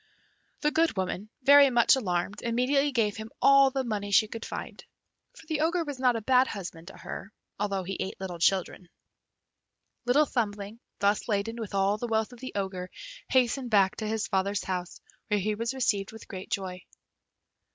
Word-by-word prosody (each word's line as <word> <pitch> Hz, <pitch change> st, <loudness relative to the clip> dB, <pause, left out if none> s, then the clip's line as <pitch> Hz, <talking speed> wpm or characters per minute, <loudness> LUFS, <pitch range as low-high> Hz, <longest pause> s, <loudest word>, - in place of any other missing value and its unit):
The 300 Hz, -, +2 dB
good 325 Hz, -7 st, +1 dB
woman, 190 Hz, +2 st, -3 dB
very 280 Hz, +1 st, +8 dB
much 240 Hz, +1 st, +5 dB
alarmed, 195 Hz, -4 st, -2 dB
immediately 255 Hz, +5 st, +1 dB
gave 225 Hz, -5 st, 0 dB
him 220 Hz, 0 st, -7 dB
all 275 Hz, 0 st, +6 dB
the 265 Hz, 0 st, -2 dB
money 210 Hz, -4 st, -3 dB
she 215 Hz, +2 st, +4 dB
could 225 Hz, +1 st, -7 dB
find, -, -, -7 dB, 0.5 s
for -, -, -14 dB
the 315 Hz, -2 st, -2 dB
Ogre 335 Hz, +2 st, +1 dB
was 290 Hz, -4 st, -6 dB
not 250 Hz, -2 st, +3 dB
a 225 Hz, -, -2 dB
bad 255 Hz, +3 st, +4 dB
husband 175 Hz, -4 st, -7 dB
to 195 Hz, -, -11 dB
her, 200 Hz, -, -8 dB, 0.3 s
although 200 Hz, -2 st, -1 dB
he 190 Hz, +2 st, -4 dB
ate 190 Hz, -, -4 dB
little 180 Hz, -3 st, -6 dB
children. 185 Hz, 0 st, 0 dB, 1.2 s
Little 275 Hz, +5 st, +4 dB
Thumbling, 210 Hz, -4 st, -3 dB, 0.2 s
thus 200 Hz, +1 st, +1 dB
laden 220 Hz, +1 st, -1 dB
with 205 Hz, -2 st, -5 dB
all 195 Hz, +2 st, +2 dB
the 240 Hz, -, -3 dB
wealth 220 Hz, +1 st, 0 dB
of 245 Hz, -, -13 dB
the 260 Hz, +1 st, -7 dB
Ogre, 190 Hz, -2 st, -3 dB, 0.4 s
hastened 255 Hz, 0 st, +2 dB
back 195 Hz, -4 st, +4 dB
to 215 Hz, -, -3 dB
his 220 Hz, 0 st, -1 dB
father's 200 Hz, 0 st, 0 dB
house, 180 Hz, -1 st, -4 dB, 0.3 s
where 210 Hz, -2 st, +1 dB
he 210 Hz, +2 st, 0 dB
was 230 Hz, +2 st, -2 dB
received 205 Hz, -6 st, 0 dB
with 225 Hz, -, -12 dB
great 190 Hz, -2 st, -8 dB
joy. 185 Hz, -2 st, -3 dB
215 Hz, 185 wpm, -28 LUFS, 195-255 Hz, 1.2 s, very